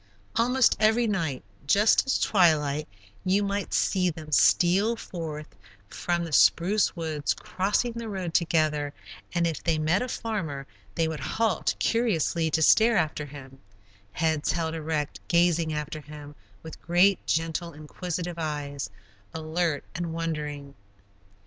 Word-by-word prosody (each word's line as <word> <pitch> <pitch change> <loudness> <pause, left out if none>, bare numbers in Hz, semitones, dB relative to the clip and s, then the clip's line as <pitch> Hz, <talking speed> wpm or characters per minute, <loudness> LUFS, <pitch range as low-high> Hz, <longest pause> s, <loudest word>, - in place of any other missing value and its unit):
Almost 250 +2 +3
every 220 +2 +4
evening, 170 - -1 0.2
just 210 - +4
at 265 - +1
twilight, 155 -6 +3 0.4
you 195 +2 +2
might 200 0 -2
see 185 -2 +2
them 155 -2 -8
steal 190 +9 +4
forth 155 - -7 0.3
from 175 -1 -2
the 165 - -7
spruce 185 +7 +3
woods, 155 -4 -2
cross 195 +5 0
the 235 -2 -5
road 185 -5 -4
together, 155 -4 +1 0.4
and 170 0 +2
if 165 -2 -2
they 165 -2 +1
met 155 +6 +1
a 250 - -2
farmer, 185 - -4 0.3
they 165 -1 +1
would 160 -1 -4
halt 210 +8 0
curiously 170 - +1
to 160 +1 +1
stare 225 +6 +5
after 150 -1 -1
him, 135 -2 -12 0.5
heads 160 -2 0
held 165 -1 -2
erect, 155 -2 -3
gazing 170 -2 +2
after 150 0 -4
him 150 0 -11 0.3
with 160 - -10
great, 180 +3 +3
gentle, 165 +2 -1
inquisitive 170 +3 -5
eyes, 145 -7 -4 0.5
alert 160 -1 -1
and 170 -1 -4
wondering. 150 -4 -4
165 Hz, 135 wpm, -26 LUFS, 150-190 Hz, 0.5 s, stare